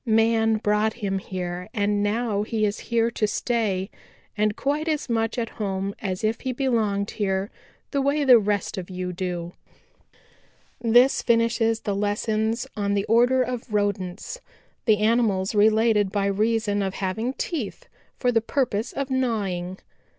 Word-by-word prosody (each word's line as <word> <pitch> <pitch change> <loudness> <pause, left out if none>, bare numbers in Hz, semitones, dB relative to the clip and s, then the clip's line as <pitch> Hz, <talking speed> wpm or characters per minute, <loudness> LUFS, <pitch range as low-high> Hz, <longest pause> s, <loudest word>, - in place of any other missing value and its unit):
Man 225 -1 +3
brought 210 0 +1
him 200 -4 -2
here 180 0 -5
and 205 -1 +1
now 210 0 0
he 215 0 0
is 205 0 -2
here 235 0 +2
to 215 -2 0
stay 210 -4 -1 0.4
and 210 0 +1
quite 290 +5 -1
as 310 -2 -1
much 225 0 0
at 230 -2 -1
home 195 -1 -2
as 190 -2 -3
if 220 +1 0
he 260 -1 -2
belonged 220 -6 0
here 195 -1 -1 0.4
the 280 - +1
way 285 +2 +1
the 255 -4 +8
rest 205 -2 -1
of 180 - -8
you 180 -1 -4
do. 175 -1 -4 1.3
"This 240 +3 +5
finishes 230 -1 +2
the 205 - -2
lessons 220 +3 0
on 200 -1 0
the 200 0 0
order 245 +3 +4
of 250 -2 -5
Rodents, 205 - -2 0.4
the 215 -3 +4
animals 210 -3 +2
related 215 -1 +3
by 200 -1 0
reason 210 +1 +1
of 195 -1 -2
having 220 +7 -2
teeth 325 - -4 0.3
for 250 - +1
the 225 -2 +2
purpose 230 -2 -1
of 275 -1 -3
gnawing. 200 -8 -1
215 Hz, 150 wpm, -24 LUFS, 200-235 Hz, 1.3 s, the